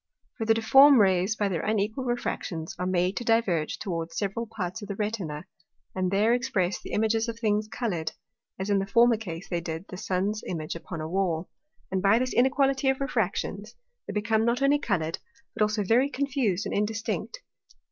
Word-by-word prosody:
For 225 - -3
the 225 - +5
difform 270 +5 +7
Rays, 190 +1 +3
by 205 -2 0
their 175 -5 -1
unequal 215 +4 -1
Refractions, 180 -9 -3
are 180 - -1
made 185 +1 +1
to - - -2
diverge 220 -9 +1
towards 165 -3 -4
several 210 +3 -2
parts 195 -3 -5
of 205 - -7
the 200 - -4
Retina, 195 -8 -3 0.5
and 185 -1 0
there 210 +5 +3
express 215 -7 0
the - - -9
Images 220 +1 +1
of 230 0 -4
things 215 -2 0
coloured, 175 -10 -3 0.4
as 190 +2 -3
in 200 - +3
the 195 - -2
former 235 +3 +5
case 175 -5 -7
they 175 -2 -2
did 165 +2 -5
the 185 - -7
Sun's 195 +4 -1
Image 155 -3 -3
upon 170 -1 -7
a 155 - -4
Wall. 175 -2 -1 0.4
And 190 -1 0
by 200 +3 +5
this 255 +1 -1
inequality 270 +2 +3
of 265 - +1
Refractions, 215 -5 -2 0.3
they 200 - -4
become 220 +1 +1
not 235 +3 +1
only 285 +1 +4
coloured, 165 - -1 0.3
but 225 - -6
also 210 0 +2
very 240 +8 +3
confused 260 -9 -1
and - - -3
indistinct. 220 - -2
210 Hz, 190 wpm, -27 LUFS, 185-230 Hz, 0.5 s, difform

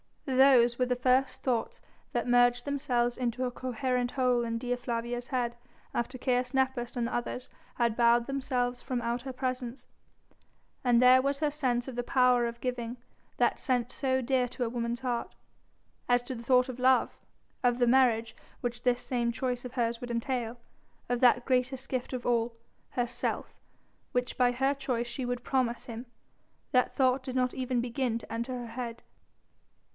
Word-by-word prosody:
Those 260 -3 +5
were 250 - +2
the 250 - +1
first 255 +1 +1
thoughts 245 -4 -1 0.3
that 240 -2 0
merged 245 0 +4
themselves 250 -4 0
into 250 0 -1
a 250 - -1
coherent 250 0 -1
whole 250 -2 +2
in 230 0 -2
Dea 245 +1 -1
Flavia's 240 0 -3
head 245 -3 -1 0.4
after 245 +2 -2
Caius 250 0 0
Nepos 260 -2 0
and 240 - +1
the 235 - -3
others 245 +1 -3 0.3
had 235 -2 +1
bowed 235 0 +4
themselves 250 -2 -1
from 250 -2 -2
out 235 +1 -1
her 265 -1 -5
presence, 255 -1 -3 1.0
and 245 -2 +4
there 255 +1 +7
was 275 +1 0
her 300 -1 +1
sense 255 -5 0
of 260 - -6
the 245 - 0
power 250 -1 +3
of 235 0 -7
giving, 245 -1 -3 0.4
that - - +2
sense 245 -3 0
so 260 -1 0
dear 255 0 +1
to 245 +1 -4
a 235 - -1
woman's 235 +1 -3
heart. 245 -2 -2 0.7
As 245 0 +4
to 260 - -5
the 235 -1 -7
thought 250 +1 +4
of 255 -1 -6
love 255 0 +3 0.5
of 245 -2 +2
the 245 - +3
marriage 235 -3 +3 0.3
which 240 -1 -3
this 245 0 +1
same 240 -2 0
choice 250 0 -2
of 250 - -7
hers 235 -2 -1
would 245 - -6
entail 235 0 -2 0.5
of 245 -1 +1
that 245 -1 +5
greatest 260 +1 0
gift 255 -2 -2
of 250 -2 -4
all 235 -1 +1 0.4
herself 245 -1 -2 0.6
which 245 0 -1
by 245 -1 +4
her 270 +3 +2
choice 250 -4 -2
she 255 +1 -4
would 245 0 -3
promise 250 -3 0
him 235 +1 -7 0.6
that 250 -1 +2
thought 260 0 +3
did 255 0 -6
not 255 -1 +1
even 255 -2 -1
begin 240 -1 -1
to 225 -1 -9
enter 235 +3 -3
her 240 -1 -6
head. 235 -1 -5
245 Hz, 180 wpm, -30 LUFS, 240-255 Hz, 1.0 s, there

